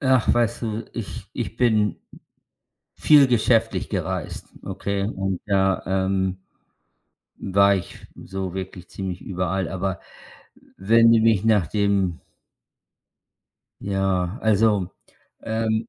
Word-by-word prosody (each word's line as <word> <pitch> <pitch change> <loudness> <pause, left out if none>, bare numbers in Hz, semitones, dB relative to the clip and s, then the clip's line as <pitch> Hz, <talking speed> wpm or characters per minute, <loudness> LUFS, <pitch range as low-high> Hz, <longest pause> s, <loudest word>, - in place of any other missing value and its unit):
Ach, 130 -3 +3
weißt 120 -1 0
du, 110 0 -3
ich 100 -4 -7
ich 115 -3 -5
bin 110 -4 +2 1.0
viel 145 -3 +5
geschäftlich 115 -1 +1
gereist, - - -4 0.2
okay? 100 -1 -3
Und 95 -3 -2
da, 95 -2 +1
ähm, 95 0 0 1.0
war 100 +1 +4
ich 95 - -7
so 95 -1 -6
wirklich 95 -1 -7
ziemlich 95 -2 -5
überall, 90 0 -2
aber 95 -1 -3 0.8
wenn 115 +4 +4
du 115 - +5
mich 110 -2 +3
nach 105 -7 +3
dem 100 -4 0 1.6
Ja, 95 0 -1
also, 105 -3 +2 0.5
ähm, 110 0 -1
100 Hz, 105 wpm, -23 LUFS, 95-110 Hz, 1.6 s, viel